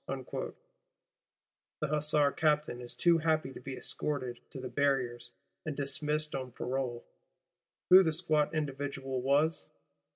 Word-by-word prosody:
the - - -4 1.3
Hussar 150 -1 +3
Captain 150 -5 +1
is 120 - -6
too 170 -1 +4
happy 155 -3 +1
to - - -9
be 135 -1 -7
escorted 130 -5 -2
to 135 - -8
the 130 - -5
Barriers, 125 -2 0 0.3
and 155 -4 -4
dismissed 150 +2 0
on 130 -3 -4
parole. 125 -2 -3 0.9
Who 185 +1 +11
the 165 -4 +2
squat 155 -2 +1
individual 135 -3 -3
was? 145 +5 +2
145 Hz, 125 wpm, -32 LUFS, 130-155 Hz, 1.3 s, Who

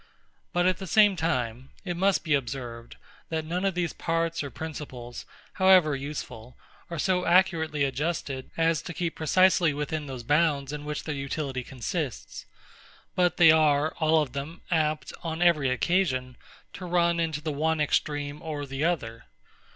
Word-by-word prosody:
But 175 0 +1
at 185 -1 +2
the 190 - -6
same 205 +2 +5
time, 130 -6 -2 0.2
it 175 -2 -2
must 195 +2 +2
be 160 -3 0
observed, 120 -3 -3 0.3
that 160 -1 -2
none 175 +4 -2
of 195 -2 0
these 175 -2 -1
parts 165 0 -1
or 140 - -5
principles, 130 -5 -7 0.3
however 185 -6 +5
useful, 135 -4 -7 0.3
are 170 - -5
so 180 +3 +1
accurately 165 -5 +3
adjusted, 140 -1 -2
as 165 -1 +2
to 175 - -8
keep 170 -2 -2
precisely 170 -1 +3
within 150 +1 -3
those 130 -3 -6
bounds 145 0 +1
in 150 0 -6
which 150 0 -4
their 155 - -3
utility 140 -2 -3
consists; 85 - -5 0.7
but 180 -1 +1
they 165 -2 +8
are, 155 -1 +3
all 160 -1 +4
of 130 -4 -9
them, 145 +5 -6
apt, 155 -2 0
on 160 -1 -4
every 170 -6 +3
occasion, 130 -3 0 0.4
to 185 - -7
run 170 -1 +2
into 160 -3 -1
the 155 0 -3
one 160 +2 0
extreme 145 -1 -1
or 150 -3 -4
the 135 +1 -4
other. 120 -10 -2
155 Hz, 160 wpm, -27 LUFS, 140-170 Hz, 0.7 s, they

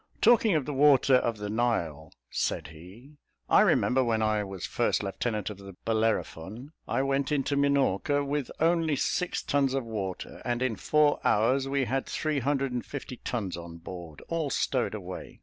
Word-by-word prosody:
"Talking 225 -4 +5
of 150 -4 +1
the 150 - -3
water 140 -1 +5
of 115 -3 -1
the 105 0 -5
Nile," 95 -9 -1 0.2
said - - -1
he, 95 - -14 0.3
"I - - +6
remember, 130 +1 +3
when 110 -2 +1
I 110 -1 +1
was 95 -3 -6
first - - 0
lieutenant 105 +1 -2
of 100 - -10
the 100 0 -10
Bellerophon 110 - -1 0.2
I 120 +4 0
went 135 +1 0
into 140 -1 0
Minorca 140 -1 +2
with 140 -1 -2
only 165 -2 +2
six 180 +5 -1
tons 140 -2 +1
of 135 -3 -1
water, 100 -5 -5
and 120 +1 -1
in 125 -4 0
four 150 +3 +2
hours 130 +6 +2
we 140 -1 +1
had 135 +2 -1
three 155 -2 -1
hundred 135 0 0
and 125 -1 -2
fifty 135 -3 -7
tons 105 -8 -3
on 85 -1 -9
board, 85 -2 -9
all 165 -3 -1
stowed - - 0
away. - - -8
125 Hz, 175 wpm, -28 LUFS, 105-140 Hz, 0.3 s, I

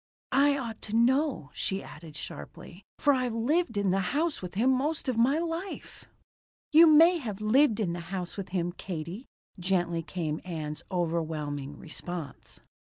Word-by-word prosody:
"I 280 +2 +4
ought 230 -5 -5
to 215 - -2
know," 255 - +2
she 195 0 -2
added 155 -1 -11
sharply, 160 - -9
"for 290 -2 +4
I've 250 -3 0
lived 245 +1 +1
in 200 -2 +2
the 195 - +2 0.2
house 325 0 0
with 180 0 -7
him 245 +6 +3
most 285 +5 0
of 255 - +1
my 250 +6 +3
life." 335 +3 -5 0.7
"You 325 +2 +9
may 330 +3 +7
have 215 -8 -5
lived 225 +2 +4
in 180 -6 0
the 175 - -4
house 185 -2 -4
with 195 -2 -6
him, 175 -2 -1
Katie," 175 +5 -6 0.3
gently 175 -2 0
came 160 -1 -3
Ann's 155 -4 -5
overwhelming 155 -5 -2
response. 170 -3 -7
200 Hz, 160 wpm, -29 LUFS, 170-270 Hz, 0.7 s, You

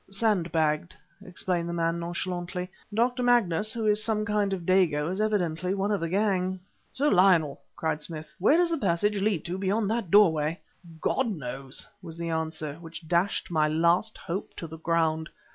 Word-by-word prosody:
"Sandbagged!" 170 -6 0 0.3
explained 180 -2 -2
the - - -3
man 165 0 0
nonchalantly. 180 +1 -4 0.2
"Dr. 245 +4 +1
Magnus, 215 -5 +3
who 230 -2 -2
is 210 0 +3
some 215 -1 0
kind 205 -1 0
of 185 -3 -3
dago, 170 -4 +2
is 190 +3 -2
evidently 185 -4 0
one 200 +1 0
of 205 - +1
the 165 - -2
gang." 190 -1 0 0.3
"Sir 285 +3 +1
Lionel!" 180 -6 +4
cried 160 -1 -2
Smith 155 0 -8
"where 245 - +5
does 350 -1 +2
the 330 - 0
passage 200 +1 +1
lead 200 -5 0
to 180 +2 -4
beyond 200 +2 0
that 225 -5 -2
doorway? 165 -5 +4 0.4
"God 265 +9 +1
knows!" 135 - -4 0.2
was 165 -2 -9
the 170 0 -3
answer, 160 -2 -3
which 165 0 -10
dashed 175 +3 0
my 155 -2 +3
last 170 +7 +2
hope 190 +3 -5
to - - -6
the 160 0 -9
ground. 160 -1 0
180 Hz, 175 wpm, -27 LUFS, 165-205 Hz, 0.4 s, where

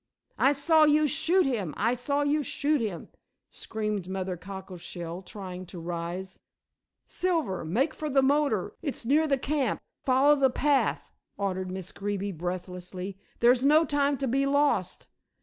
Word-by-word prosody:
"I 275 - +5
saw 310 +2 +4
you 300 +1 +4
shoot 335 +6 +3
him; 210 - -2
I 230 +3 +2
saw 280 +4 0
you 295 +1 +2
shoot 290 0 0
him," 205 -7 -4 0.4
screamed 210 -4 -4
Mother 190 -1 -3
Cockleshell, 180 -2 -7
trying 185 -2 -8
to 175 - -9
rise. 175 +3 -5 0.7
"Silver, 330 - -1
make 240 - 0
for 305 - -4
the 270 -1 +3
motor; 275 -8 +1
it's 285 -6 -4
near 300 +6 +3
the 275 -2 +2
camp; 270 -2 -1 0.2
follow 270 +3 +5
the 275 -2 +3
path," 280 +2 +1 0.3
ordered 190 -2 -2
Miss 185 0 -6
Greeby 200 0 -3
breathlessly; 180 +2 -5 0.2
"there's 245 +2 +5
no 305 +3 +5
time 285 -1 +1
to 270 - -2
be 275 +3 +1
lost. 285 +1 +1
235 Hz, 150 wpm, -28 LUFS, 185-285 Hz, 0.7 s, I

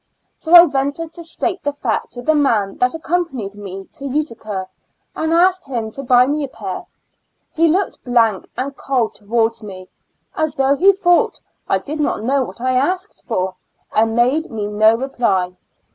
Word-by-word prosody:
So 330 +2 +3
I 345 0 +11
ventured 285 +2 -2
to 340 - -9
state 350 +3 -2
the 290 - -1
fact 255 -6 -2
to 245 0 -8
the 315 - +3
man 225 -10 +1
that 250 0 +1
accom 345 +2 0
panied 205 -7 -6
me 195 -1 -8
to 280 -4 -7
Utica, 230 -9 -3 0.5
and 320 0 -1
asked 360 +2 +3
him 230 -4 -3
to 275 - -6
buy 250 -1 +5
me 295 +2 -1
a - - -2
pair; - - -7 0.7
he 330 +1 +3
looked 370 +4 0
blank 230 -5 +2
and 275 +2 -3
cold 255 -6 -1
to 210 - -23
wards 230 +1 +1
me, 185 -3 -10 0.5
as 315 -1 -1
though 270 +1 +3
he 380 +7 +6
thought 360 -3 +2 0.3
I - - +3
did 305 +2 -6
not 290 -7 -1
know 270 +4 +2
what 240 - -9
I 255 +1 0
asked 360 +10 -1
for, 185 -5 -2 0.4
and 225 +1 +2
made 260 +7 +2
me 215 -3 -4
no 215 +2 +4
reply. 215 -8 -1
260 Hz, 185 wpm, -19 LUFS, 220-315 Hz, 0.7 s, I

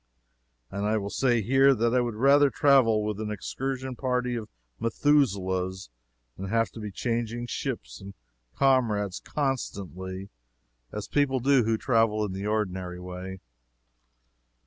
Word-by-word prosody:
And 100 +1 -3
I 105 +1 +1
will 100 -1 -4
say, 120 -4 +2
here, 135 +4 +5
that 115 +1 +1
I 125 - +4
would 120 -2 -2
rather 140 +4 +5
travel 130 -7 +4
with 105 -1 -3
an 110 -1 -3
excursion 130 +6 -4
party 125 -1 -1
of 110 -3 -5 0.3
Methuselahs 95 - +1 0.4
than 95 - -6
have 115 +1 +1
to - - -10
be 105 -1 -5
changing 120 +3 -2
ships - - -5
and 100 0 -10 0.4
comrades 110 -8 +2
constantly, 95 - -4 0.6
as 105 -1 -5
people 140 -2 +1
do 130 -1 +3
who 110 0 +1
travel 115 -3 +2
in 100 - -4
the 95 +2 -4
ordinary 95 -4 -2
way. 90 +1 -7
110 Hz, 140 wpm, -27 LUFS, 100-130 Hz, 0.6 s, here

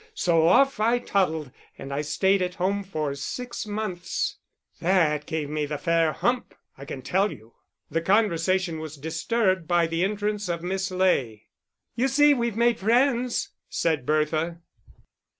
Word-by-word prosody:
So 165 -2 +3
off 270 +8 +4
I 230 +3 +3
toddled, 160 - -1 0.3
and 135 +1 -7
I 140 - -1
stayed 190 +6 +1
at 180 0 -2
home 195 +3 0
for 155 -7 -3
six 235 - -5
months. 205 -4 -3 0.4
That 165 -5 +2
gave 155 -2 -2
me 150 0 -2
the 150 0 -3
fair 165 +1 +2
hump, 245 +8 -1 0.2
I 140 - -10
can 135 -3 -7
tell 190 +8 +1
you." 110 +1 -13 0.4
The 165 - 0
conversation 185 -3 +1
was 155 -1 -7
disturbed 185 - 0
by 175 0 +3
the 165 +1 -1
entrance 205 0 -1
of 170 -1 -2
Miss 190 +2 -2
Ley. 135 - 0 0.4
"You 245 +3 +1
see 290 +2 +5
we've 235 -4 -1
made 235 -1 +3
friends," 245 +3 +2 0.2
said 155 -6 -1
Bertha. 155 +2 0
180 Hz, 150 wpm, -25 LUFS, 155-210 Hz, 0.4 s, see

